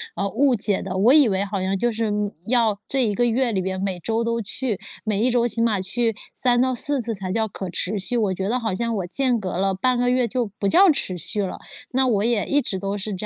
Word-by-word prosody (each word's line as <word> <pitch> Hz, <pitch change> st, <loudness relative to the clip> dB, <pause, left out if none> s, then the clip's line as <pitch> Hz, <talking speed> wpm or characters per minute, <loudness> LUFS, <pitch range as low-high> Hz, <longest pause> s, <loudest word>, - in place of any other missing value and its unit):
呃， 200 Hz, -, -1 dB
误 265 Hz, +5 st, +2 dB
解 205 Hz, -2 st, +1 dB
的。 185 Hz, -1 st, -5 dB
我 220 Hz, +7 st, +5 dB
以 295 Hz, -4 st, +6 dB
为 195 Hz, -2 st, 0 dB
好 200 Hz, 0 st, -3 dB
像 190 Hz, +1 st, 0 dB
就 240 Hz, +5 st, 0 dB
是， 225 Hz, -1 st, -1 dB
嗯， 205 Hz, -1 st, -1 dB, 0.2 s
要 225 Hz, -4 st, +2 dB
这 270 Hz, -1 st, +1 dB
一 210 Hz, -3 st, 0 dB
个 240 Hz, -, +2 dB
月 240 Hz, +1 st, +1 dB
里 190 Hz, -3 st, 0 dB
面 190 Hz, 0 st, -3 dB
每 190 Hz, -2 st, -2 dB
周 225 Hz, +6 st, -1 dB
都 230 Hz, 0 st, -1 dB
去， 220 Hz, 0 st, -3 dB, 0.2 s
每 210 Hz, -2 st, -1 dB
一 250 Hz, -, +2 dB
周 240 Hz, 0 st, +2 dB
起 230 Hz, -1 st, 0 dB
码 215 Hz, -4 st, +1 dB
去 225 Hz, +4 st, -1 dB, 0.2 s
3-4 255 Hz, +2 st, +1 dB
次 230 Hz, 0 st, -3 dB
才 190 Hz, -1 st, -5 dB
叫 220 Hz, +2 st, 0 dB
可 190 Hz, -2 st, -6 dB
持 185 Hz, +4 st, -2 dB
续， 240 Hz, +6 st, -2 dB
我 210 Hz, -5 st, +1 dB
觉 190 Hz, +1 st, -3 dB
得 250 Hz, +3 st, +1 dB
好 220 Hz, -4 st, -2 dB
像 230 Hz, +2 st, -1 dB
我 185 Hz, -3 st, -3 dB
间 250 Hz, +4 st, +1 dB
隔 185 Hz, -4 st, -4 dB
了 195 Hz, +1 st, +1 dB
半 245 Hz, +7 st, +1 dB
个 245 Hz, 0 st, +1 dB
月 250 Hz, -1 st, +2 dB
就 245 Hz, +2 st, -1 dB
不 200 Hz, -, 0 dB
叫 365 Hz, -, +6 dB
持 185 Hz, -10 st, -2 dB
续 210 Hz, +5 st, -3 dB
了， 190 Hz, -, -5 dB, 0.3 s
那 260 Hz, +1 st, +2 dB
我 210 Hz, -5 st, +1 dB
也 230 Hz, -3 st, +1 dB
一 290 Hz, +1 st, +2 dB
直 195 Hz, -, -1 dB
都 195 Hz, +2 st, -3 dB
是 205 Hz, +1 st, -4 dB
这 190 Hz, +3 st, -5 dB
220 Hz, 275 characters per minute, -22 LUFS, 195-245 Hz, 0.3 s, 以